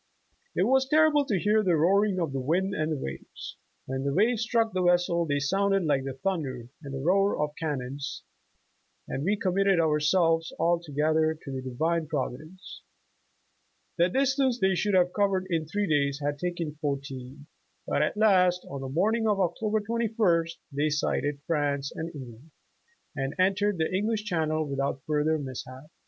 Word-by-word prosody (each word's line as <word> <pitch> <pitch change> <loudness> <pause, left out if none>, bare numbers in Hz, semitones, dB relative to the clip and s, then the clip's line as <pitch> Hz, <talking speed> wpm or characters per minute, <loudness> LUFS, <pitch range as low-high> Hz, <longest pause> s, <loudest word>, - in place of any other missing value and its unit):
"It - - +2
was 265 0 +2
terrible 300 -1 +4
to 210 -7 0
hear 210 +4 +2
the 180 -5 +2
roaring 190 +4 +3
of 165 -6 -2
the 135 - -1
wind 180 +9 0
and 155 -5 -1
the 155 - -1
waves. 65 - -8 0.3
When 130 0 -3
the 140 - 0
waves 220 +4 +2
struck 230 -1 +1
the 185 - 0
vessel, 175 -1 +2
they 145 -1 +1
sounded 195 +6 +1
like 140 -3 +1
the 135 -1 -4
thunder 135 -8 -3
and 135 -2 -6
roar 195 +3 +3
of 150 0 -1
cannons, 140 -3 -4 0.8
and 135 - -3
wa 200 +5 +2
committed 195 0 +2
ourselves 165 +1 +2
altogether 160 -1 +1
to 140 - -7
the 130 -1 -4
Divine 160 +6 -1
Provi 140 -5 -2
dence. 170 +6 -12 0.5
' - - -44
' - - -44
The 175 +2 +4
distance 265 +2 +1
they 190 0 +3
should 205 +2 +1
have 180 -1 +3
covered 195 -2 +1
in 160 -2 0
three 205 +5 -1
days 140 -2 +1
had 145 0 -2
taken 175 -4 -3
fourteen, 140 -1 -5 0.4
but - - 0
at - - 0
last 185 -4 +3
on 140 -1 -5
the 135 - -5
morning 220 - +1
of 205 -2 +2
Oc 175 -3 +1
tober 215 0 0
21st 210 -7 0 0.2
they 145 +2 0
sighted 145 -1 -1
France 145 -3 -1
and 160 +1 -4
England, 130 +1 -10 0.7
and 135 0 -3
en 185 +1 +4
tered 205 0 0
the 160 +2 -1
English 210 +3 0
Channel 155 -5 -1
without 140 -1 -2
further 155 +1 +1
mishap. 130 +1 -8
165 Hz, 175 wpm, -27 LUFS, 145-195 Hz, 0.8 s, terrible